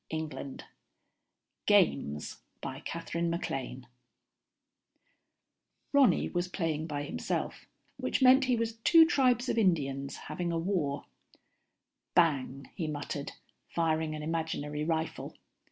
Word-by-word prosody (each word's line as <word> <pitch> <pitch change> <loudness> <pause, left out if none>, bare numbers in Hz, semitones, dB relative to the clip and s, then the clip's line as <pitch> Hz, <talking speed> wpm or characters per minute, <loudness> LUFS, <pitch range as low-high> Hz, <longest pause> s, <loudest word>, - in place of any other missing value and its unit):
Illustrated 155 -3 -5 2.0
by 135 +1 -6
ASHMAN 165 -6 -3 2.1
Ronny 270 -10 +4
was 175 0 -1
playing 160 -4 -2
by 145 -2 -3
himself, 145 - -3 0.3
which - - -1
meant 260 0 +7
he 255 -1 +3
was 225 -1 -2
two 325 +8 +7
tribes 255 -6 +3
of 230 - +1
Indians 140 -8 +1
having 175 -1 -3
a 165 - 0
war. 165 -5 -1 1.1
"Bang," 140 -6 +2
he 165 - -3
muttered, 145 -1 -4 0.3
firing 160 -2 0
an 150 - -6
imaginary 155 -2 -2
rifle. 160 0 -2
165 Hz, 100 wpm, -31 LUFS, 145-185 Hz, 2.1 s, meant